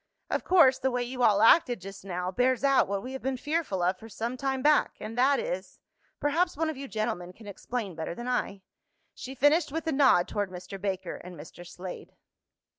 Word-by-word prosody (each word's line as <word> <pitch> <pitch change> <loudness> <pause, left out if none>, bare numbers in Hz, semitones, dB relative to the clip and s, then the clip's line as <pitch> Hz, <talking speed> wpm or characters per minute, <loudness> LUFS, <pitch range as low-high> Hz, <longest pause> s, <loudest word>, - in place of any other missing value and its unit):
Of - - 0
course 310 -8 +5
the 265 - +1
way 245 -1 -1
you 250 +1 -5
all 210 -3 +4
acted 245 - +5
just 195 +1 -10
now 180 -1 -3
bears 250 +5 +1
out 275 -1 +4
what 200 0 -3
we 260 - -6
have 265 - -6
been 265 0 -2
fearful 290 - -2
of 185 +2 +1
for 225 - -11
some 230 +4 -4
time 265 0 -2
back, 300 0 +3
and 215 +1 -7
that 265 +3 +3
is 185 +1 -5 0.4
perhaps 320 +3 +1
one 320 0 0
of - - -9
you 275 +1 -7
gentlemen 215 -6 -3
can 220 - -15
explain 205 +1 -5
better 160 +1 -5
than 240 +4 -7
I," 200 -6 -2 0.5
she 265 +1 -8
finished 295 +3 +3
with 325 +2 -3
a 320 - 0
nod 265 - +4
toward 205 -2 -2
Mr. 185 +1 -9
Baker 195 -2 -3
and 180 0 -11
Mr. 160 +3 -11
Slade. 180 +1 -9
240 Hz, 210 wpm, -28 LUFS, 190-270 Hz, 0.5 s, course